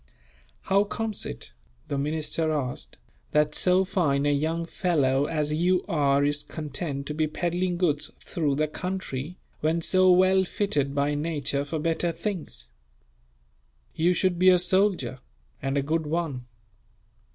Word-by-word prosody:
"How 195 +1 +3
comes 215 0 -3
it," 60 - -8 0.3
the - - -2
minister 155 +2 -1
asked, 135 -5 -3 0.4
"that 150 0 +3
so 185 +3 +3
fine 150 -7 +1
a 145 - +3
young 160 +4 -1
fellow 145 -7 +1
as 150 -1 -1
you 180 +3 +2
are 140 -3 +2
is 145 0 0
content 150 -3 -5
to 150 - -4
be 155 0 0
peddling 175 +3 -1
goods 155 -5 +1
through 150 -5 -1
the 155 +2 +1
country, 180 -2 -5 0.2
when 160 +2 +1
so 185 +2 +4
well 185 +1 +5
fitted 150 -8 -1
by 145 +1 +1
nature 145 -2 -1
for 145 +3 -4
better 165 +2 0
things? 155 - -5 1.2
You 175 +3 +2
should 180 -1 +1
be 185 +1 +7
a 180 - +7
soldier, 180 - +1 0.4
and 135 +1 -1
a 140 - +1
good 160 +2 -1
one. 150 -6 -2
160 Hz, 145 wpm, -26 LUFS, 145-180 Hz, 1.2 s, be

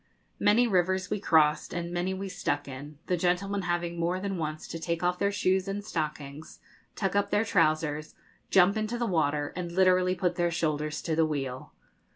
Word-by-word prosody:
Many 225 +4 +4
rivers 190 -2 +1
we - - 0
crossed, 155 -4 +3
and 170 0 -3
many 175 +2 -1
we 190 +1 -4
stuck 145 -6 -2
in, 140 +2 -8
the 180 - +1
gentlemen 180 +3 0
having 175 -1 -2
more 175 +2 0
than 195 -2 -3
once 155 -1 -4
to 165 - -5
take 170 +1 -2
off 180 0 +1
their 200 0 +2
shoes 190 -1 +1
and 200 +1 -4
stockings, 150 -3 -5 0.4
tuck 195 -2 -1
up 200 0 +2
their 205 +2 +2
trousers, 155 -5 +1 0.3
jump 190 +3 +5
into 215 +2 -2
the 240 - -1
water, 150 -6 0
and 175 -1 -4
literally 185 0 +3
put 180 0 -1
their 175 -1 +2
shoulders 155 -2 -1
to 160 - -1
the 160 0 +3
wheel. 135 -4 -4
175 Hz, 190 wpm, -28 LUFS, 155-190 Hz, 0.4 s, jump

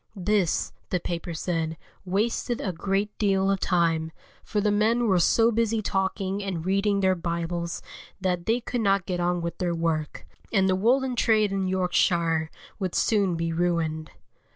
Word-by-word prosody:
This, 195 -2 0 0.2
the 180 - 0
paper 170 0 -4
said, 160 -1 -2 0.3
wasted 220 +5 -1
a 190 - -2
great 195 +4 -1
deal 195 -2 +2
of 195 - 0
time, 165 -3 +1 0.3
for 210 - -2
the 210 0 +2
men 225 +4 +2
were 190 -3 +3
so 225 +7 +4
busy 230 0 +1
talking 195 +1 -1
and 180 -4 -4
reading 200 +1 +1
their 190 -1 +4
Bibles 170 -1 -3 0.4
that 180 -2 -1
they 230 +2 +2
could 245 0 -2
not 195 -3 +2
get 180 -1 -2
on 175 0 0
with 170 0 -4
their 175 -2 0
work, 160 -2 -2 0.3
and 195 -3 +3
the 190 - +3
woollen 250 +6 +2
trade 215 -3 +3
in 195 -1 -1
Yorkshire 170 -3 +1 0.3
would 185 -3 -2
soon 200 -5 +2
be 165 0 -2
ruined. 165 -3 -1
190 Hz, 165 wpm, -26 LUFS, 170-205 Hz, 0.4 s, so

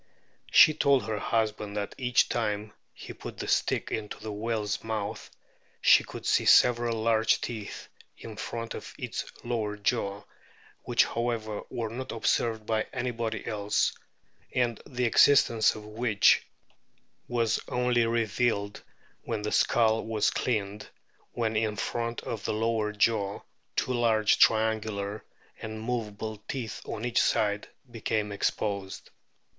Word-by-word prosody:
She 155 - +8
told 140 -6 +3
her 110 -1 -2
husband 105 -2 -1
that 100 -1 -3
each 125 -2 +2
time 105 -2 -2 0.2
he - - -10
put - - -9
the - - -5
stick - - 0
into 105 -1 -4
the 110 0 -6
whale's 105 -1 -2
mouth 110 -2 -4 0.5
she - - +6
could - - -9
see - - +2
several 120 -2 +5
large 110 -1 +3
teeth 110 -4 -6 0.3
in 110 -1 -9
front 115 +2 -5
of - - -8
its - - -4 0.2
lower 110 -3 -2
jaw, 100 -1 -1 0.6
which, - - +3
however, 115 -3 -2
were 115 -2 -4
not 130 +3 -5
observed 110 -1 0
by 110 -1 0
anybody 115 -2 -3
else, 105 -2 0 0.6
and 120 -3 +1
the 125 -1 -1
existence 115 -2 +5
of 105 -1 -9
which 105 -1 +3 0.8
was 115 -2 +1
only 125 -1 +1
revealed 115 -2 0 0.4
when 110 -3 -4
the 105 - -2
skull 115 -1 +3
was 110 -2 +1
cleaned, 105 -3 -2 0.4
when 110 -2 -1
in 110 -1 0
front 115 +3 -3
of 110 -4 -5
the - - 0
lower 110 -1 0
jaw 105 -1 +1 0.3
two 130 - 0
large 115 -3 +3
triangular 110 -2 +2 0.4
and 110 0 -6
movable 110 -2 -4
teeth 125 -5 -5
on 115 +1 -5
each 120 -1 +2
side 105 -1 +1 0.2
became 110 -2 -2
o - - -4
exposed. 100 -1 -3
110 Hz, 135 wpm, -28 LUFS, 105-115 Hz, 0.8 s, She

